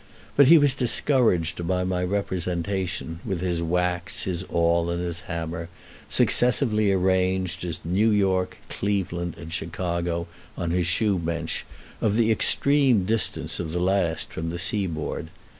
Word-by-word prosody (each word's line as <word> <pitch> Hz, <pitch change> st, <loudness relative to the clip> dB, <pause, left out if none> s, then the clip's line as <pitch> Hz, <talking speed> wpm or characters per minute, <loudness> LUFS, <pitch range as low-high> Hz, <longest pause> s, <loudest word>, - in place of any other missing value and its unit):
But 140 Hz, -2 st, +6 dB
he 165 Hz, +3 st, +8 dB
was 145 Hz, -3 st, +5 dB
discouraged 115 Hz, -, +2 dB
by 90 Hz, 0 st, 0 dB
my 90 Hz, -1 st, -1 dB
representation, 90 Hz, -2 st, -2 dB
with 95 Hz, -5 st, -3 dB
his 90 Hz, -2 st, -1 dB
wax, 90 Hz, +2 st, -1 dB
his 90 Hz, -1 st, -3 dB
awl, 85 Hz, 0 st, +1 dB
and 85 Hz, 0 st, -2 dB
his 85 Hz, -1 st, -3 dB
hammer, 85 Hz, 0 st, -4 dB, 0.4 s
successively 115 Hz, -4 st, +4 dB
arranged 95 Hz, -1 st, 0 dB
as 85 Hz, -1 st, -4 dB
New 95 Hz, +7 st, +2 dB
York, 95 Hz, -3 st, +1 dB
Cleveland, 90 Hz, -4 st, -2 dB
and 80 Hz, -1 st, -8 dB
Chicago, 85 Hz, 0 st, -2 dB, 0.3 s
on 85 Hz, -1 st, -2 dB
his 90 Hz, -1 st, 0 dB
shoe 100 Hz, +2 st, +1 dB
bench, 85 Hz, 0 st, -3 dB, 0.3 s
of 105 Hz, -1 st, +1 dB
the 115 Hz, -1 st, +3 dB
extreme 135 Hz, -3 st, +3 dB
distance 110 Hz, +2 st, 0 dB
of 80 Hz, -2 st, -4 dB
the 90 Hz, -, -1 dB
last 90 Hz, -4 st, 0 dB
from 80 Hz, +1 st, -4 dB
the 85 Hz, -, -4 dB
seaboard. 85 Hz, -5 st, -2 dB
90 Hz, 140 wpm, -24 LUFS, 85-100 Hz, 0.4 s, he